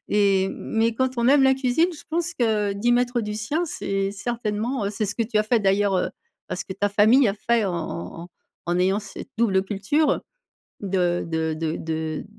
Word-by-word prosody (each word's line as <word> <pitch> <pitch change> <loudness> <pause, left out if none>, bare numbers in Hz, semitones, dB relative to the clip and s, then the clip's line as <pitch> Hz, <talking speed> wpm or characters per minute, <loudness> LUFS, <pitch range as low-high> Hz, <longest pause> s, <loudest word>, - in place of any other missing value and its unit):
et 195 -2 +3
mais 225 +1 -1
quand 260 +2 +1
on 235 +2 +3
aime 280 0 +6
la 265 0 +6
cuisine, 265 +6 +2
je 300 - -13
pense 340 +1 -1
que 215 -7 +1
d'y 205 +5 0
mettre 245 0 +2
du 210 -1 -4
sien, 290 +11 -1
c'est 195 -7 -2
certainement 220 +1 -2
c'est 215 +1 -2
ce 205 0 -3
que 230 - 0
tu 220 0 -3
as 215 - +5
fait 225 +1 +2
d'ailleurs, 195 0 +2
heu, 185 - 0 0.4
ben - - -3
ce - - -4
que 190 - -6
ta 205 +2 0
famille 215 +5 +5
a 195 - -1
fait 230 0 +1
en 180 - -2
en 155 - -5
en - - -13 0.4
en 175 +1 +1
ayant 190 +3 +2
cette 210 - -9
double 200 -5 +2
culture, 205 +10 0 0.6
de 180 -3 0
de 160 -1 -1
de 160 0 -2
de 160 -1 -3
210 Hz, 210 wpm, -24 LUFS, 195-240 Hz, 0.6 s, aime